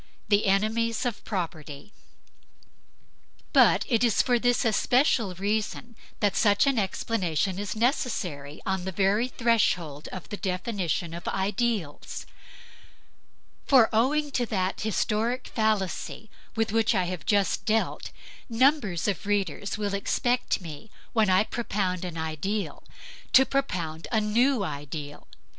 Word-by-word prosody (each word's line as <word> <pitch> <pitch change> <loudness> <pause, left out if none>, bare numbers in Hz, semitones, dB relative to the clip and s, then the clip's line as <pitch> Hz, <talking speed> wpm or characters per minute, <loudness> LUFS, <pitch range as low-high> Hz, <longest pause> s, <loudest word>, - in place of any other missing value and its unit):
THE 205 0 +3
ENEMIES 220 +4 +1
OF 240 -4 -3
PROPERTY 165 -3 -5 1.6
But - - +5
it 235 -2 +2
is 230 -4 +3
for 245 -1 +2
this 245 +1 +2
especial 225 -2 +2
reason 215 +4 -2 0.3
that 205 -1 +2
such 205 +1 +4
an 275 -4 +2
explanation 190 -3 -1
is 205 -1 -3
necessary 205 - -2
on 190 -2 -1
the 190 - -2
very 200 +5 +2
threshold 185 - 0
of 185 - -8
the 205 - -5
definition 180 -3 -2
of 170 - -7
ideals. 195 -4 -2 1.4
For 255 -5 +6
owing 285 +6 +2
to 245 -3 0
that 190 -3 -1
historic 220 +3 -1
fallacy 215 -1 -1 0.2
with 225 -2 0
which 225 0 +2
I 185 - +2
have 175 -4 -4
just 200 +3 +1
dealt, 220 +1 0 0.4
numbers 230 - +2
of 200 0 -2
readers 205 0 -1
will 205 -2 -2
expect 245 +4 0
me, 165 +5 -9 0.2
when 220 -4 +3
I 185 +2 +5
propound 195 -6 -2
an 170 -2 -6
ideal, 160 +7 -3 0.5
to 265 - +8
propound 170 -14 -2
a 220 - +3
new 230 +3 +2
ideal. 145 -2 -6
205 Hz, 125 wpm, -27 LUFS, 185-230 Hz, 1.6 s, to